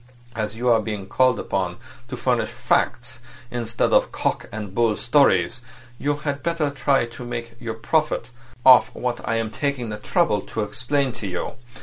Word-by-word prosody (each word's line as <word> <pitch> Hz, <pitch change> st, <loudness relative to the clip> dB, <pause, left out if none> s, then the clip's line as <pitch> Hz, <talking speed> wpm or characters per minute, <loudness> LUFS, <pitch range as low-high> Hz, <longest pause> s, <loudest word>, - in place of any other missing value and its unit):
As 110 Hz, -1 st, -3 dB
you 120 Hz, +2 st, -2 dB
are 115 Hz, -2 st, +5 dB
being 105 Hz, -3 st, -4 dB
called 125 Hz, +3 st, +2 dB
upon 90 Hz, -2 st, -2 dB, 0.3 s
to -, -, -6 dB
furnish -, -, +1 dB
facts 125 Hz, +2 st, -1 dB, 0.3 s
instead 115 Hz, -1 st, 0 dB
of -, -, +4 dB
cock -, -, -2 dB
and 105 Hz, -3 st, -6 dB
bull 115 Hz, -1 st, +2 dB
stories, 120 Hz, -5 st, +3 dB, 0.4 s
you 145 Hz, +1 st, 0 dB
had 145 Hz, -1 st, -3 dB
better 160 Hz, -2 st, 0 dB
try 135 Hz, -2 st, +2 dB
to 120 Hz, +1 st, -9 dB
make 120 Hz, -1 st, -5 dB
your 115 Hz, -2 st, -4 dB
profit 140 Hz, 0 st, 0 dB, 0.3 s
off 130 Hz, -1 st, +7 dB
what 125 Hz, -1 st, -2 dB
I 115 Hz, -, +2 dB
am 115 Hz, -1 st, -1 dB
taking 130 Hz, -1 st, -2 dB
the 105 Hz, -, -4 dB
trouble 105 Hz, -, +1 dB
to 110 Hz, -, -3 dB
explain 130 Hz, +6 st, -1 dB
to 115 Hz, -3 st, -6 dB
you. 90 Hz, -2 st, -3 dB
120 Hz, 175 wpm, -23 LUFS, 110-135 Hz, 0.4 s, off